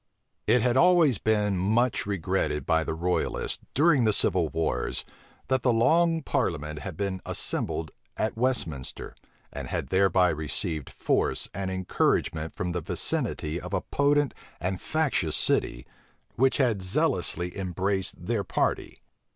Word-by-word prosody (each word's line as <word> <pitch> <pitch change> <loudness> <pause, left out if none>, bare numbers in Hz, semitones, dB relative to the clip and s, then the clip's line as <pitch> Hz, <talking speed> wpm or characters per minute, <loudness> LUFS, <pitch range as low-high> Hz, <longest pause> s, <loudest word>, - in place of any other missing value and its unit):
It 115 +1 +4
had 125 0 +2
always 165 - +5
been 105 -2 +1
much 110 +5 +1
regretted 90 -6 -1
by 80 0 +2
the 80 - -3
royalists, 90 +2 -1 0.2
during 145 -3 +4
the 110 -2 +3
civil 85 -4 +2
wars, 80 -7 -2 0.4
that 130 -1 +1
the 125 - +3
long 165 +7 +3
parliament 75 - -1
had 90 -3 -7
been 95 -2 -2
assembled - - -3 0.3
at 110 - -1
Westminster, 115 - -2 0.4
and - - -5
had - - -3
thereby 95 -1 +4
received 75 -1 -3
force - - -1
and 95 +1 -3
encouragement 85 -3 0
from 90 0 -2
the 90 0 -2
vicinity 75 +1 -1
of 90 +2 -4
a 95 - 0
potent 145 -1 +1 0.3
and 90 +1 -2
factious 140 - 0
city, - - +1 0.5
which 130 +2 +3
had 120 -8 +2
zealously 90 -1 -1
embraced 95 -1 -2
their 110 -1 0
party. - - -2
95 Hz, 135 wpm, -27 LUFS, 85-120 Hz, 0.5 s, always